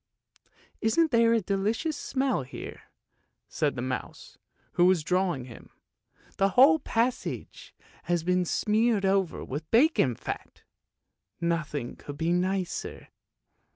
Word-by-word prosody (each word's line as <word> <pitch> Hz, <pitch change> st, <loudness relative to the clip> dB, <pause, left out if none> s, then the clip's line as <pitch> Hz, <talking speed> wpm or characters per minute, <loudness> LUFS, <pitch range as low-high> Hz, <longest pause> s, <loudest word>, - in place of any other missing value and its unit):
" -, -, -35 dB, 0.3 s
Isn't 310 Hz, +9 st, +2 dB
there 230 Hz, -1 st, +4 dB
a 230 Hz, -, +2 dB
delicious 210 Hz, -, -1 dB
smell 265 Hz, -, -1 dB
here? 130 Hz, -, -9 dB, 0.3 s
" -, -, -44 dB, 0.3 s
said 145 Hz, -3 st, -1 dB
the 120 Hz, -, -4 dB
mouse 130 Hz, 0 st, -6 dB, 0.3 s
who 175 Hz, -, +3 dB
was 180 Hz, -4 st, +3 dB
drawing 180 Hz, -6 st, 0 dB
him; 120 Hz, -3 st, -13 dB, 0.3 s
" -, -, -31 dB
the 195 Hz, -, +4 dB
whole 295 Hz, +5 st, +7 dB
passage 240 Hz, 0 st, -3 dB, 0.3 s
has 175 Hz, -2 st, 0 dB
been 180 Hz, +1 st, +2 dB
smeared 215 Hz, +3 st, +1 dB
over 190 Hz, -2 st, 0 dB
with 150 Hz, +4 st, -6 dB
bacon 230 Hz, -, +3 dB
fat! -, -, -7 dB, 0.8 s
Nothing 160 Hz, -7 st, -2 dB
could 145 Hz, -1 st, -9 dB
be 165 Hz, +2 st, 0 dB
nicer." 185 Hz, 0 st, -2 dB
185 Hz, 130 wpm, -28 LUFS, 160-230 Hz, 0.8 s, whole